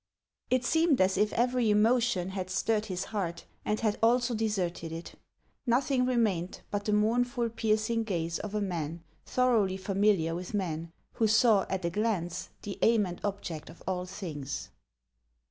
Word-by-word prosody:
It 255 -1 +2
seemed 320 0 +3
as 190 0 +3
if 210 0 +2
every 245 -1 +2
emotion 215 -3 +3
had 185 -1 -4
stirred 215 +3 0
his 185 -2 -3
heart, 175 -6 -4 0.2
and 210 - 0
had 215 -2 0
also 240 +2 +3
de 225 0 0
serted 175 -5 -2
it; 165 +1 -7 0.5
nothing 255 +1 +2
remained 210 -8 0
but 205 0 -2
the 210 - +1
mournful, 235 +3 +2
piercing 220 0 0
gaze 170 -5 -2
of 210 0 -5
a 210 - 0
man 170 -4 -3 0.2
thoroughly 225 -7 +2
familiar 195 -3 +2
with 180 +4 -4
men, 165 -4 -2 0.3
who 225 - +3
saw, 220 -2 +4
at 190 -2 -2
a 170 - 0
glance, 185 -4 -1
the 205 - -6
aim 225 -3 +4
and 175 -1 -7
object 180 -6 -4
of 165 - -14
all 180 -1 -2
things. 155 -8 -5
205 Hz, 165 wpm, -30 LUFS, 180-230 Hz, 0.5 s, saw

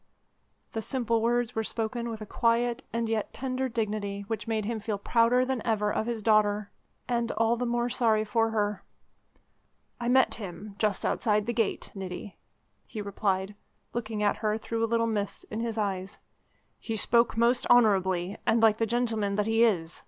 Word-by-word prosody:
The 225 - -3
simple 230 -2 0
words 240 +1 +1
were 225 - -1
spoken 235 +2 -3
with 225 -1 -6
a - - -5
quiet 235 +2 +1
and 230 0 -1
yet 220 -2 -2
tender 260 0 -2
dignity 210 -3 -2
which 225 +2 -4
made 220 -2 -1
him 225 0 -2
feel 210 -1 -3
prouder 235 +4 +3
than 260 -2 -2
ever 210 -3 +1
of 220 - -1
his 230 -3 -3
daughter 210 -1 +2 0.4
and 235 -1 0
all 225 +1 +2
the 245 +1 -2
more 240 0 0
sorry 225 -3 +2
for 225 +1 +1
her. 210 -2 -1 1.2
"I 240 - -3
met 260 0 +4
him 195 +2 -7
just 210 -3 0
outside 210 -2 +1
the 240 - -1
gate, 225 -3 -1
Niti," 190 0 -7 0.5
he 220 - -7
replied, 200 -1 -1 0.4
looking 220 -3 -3
at 205 - +2
her 215 -1 0
through 230 +1 -3
a 230 - +1
little 230 0 +2
mist 210 -3 -3
in 215 - -3
his 230 -1 -2
eyes, 195 -2 -2 0.6
"He 225 - -4
spoke 235 +2 +2
most 240 +2 +3
honourably, 195 -5 +3
and 230 - +3
like 220 -1 +5
the 225 - 0
gentleman 225 -4 0
that 210 0 +1
he 225 +1 +3
is. 175 -7 +1
225 Hz, 180 wpm, -28 LUFS, 210-235 Hz, 1.2 s, like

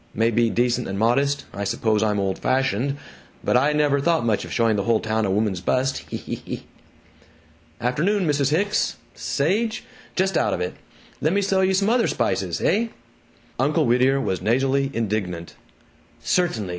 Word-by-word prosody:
May 115 +2 +2
be 115 +1 +2
decent 120 +1 0
and 95 - -4
modest 140 +6 +1
I 100 - -4
suppose 110 +2 0
I'm 105 -2 +1
old 95 -1 -1
fashioned 130 +1 0 0.5
but - - +1
I 140 +4 +4
never 150 -1 +2
thought 165 -4 +1
much 110 -3 +1
of - - -9
showing 115 -2 +2
the 100 -1 -1
whole 115 -2 +3
town 110 -1 -1
a - - -2
woman's 100 -2 0
bust! 130 +7 0
Hee, - - -7
hee, - - -5
hee!... - - -6 1.1
Afternoon, 170 - +1
Mrs. 145 -3 +1
Hicks. 200 +7 0 0.2
Sage? 215 +10 -1 0.3
Just 190 -1 +1
out 105 - +1
of - - -5
it. 90 - -2 0.5
Lemme 190 +7 +2
sell 190 -1 +2
you 190 0 +2
some 200 +3 +2
other 240 -1 +3
spices. - - -1
Heh?" 230 +3 +1 0.7
Uncle 150 +4 +2
Whittier 130 +3 +3
was 95 -9 -2
nasally 135 +6 +1
indignant 100 -7 -3 0.7
"CERTAINLY! 115 - 0
130 Hz, 170 wpm, -23 LUFS, 110-155 Hz, 1.1 s, I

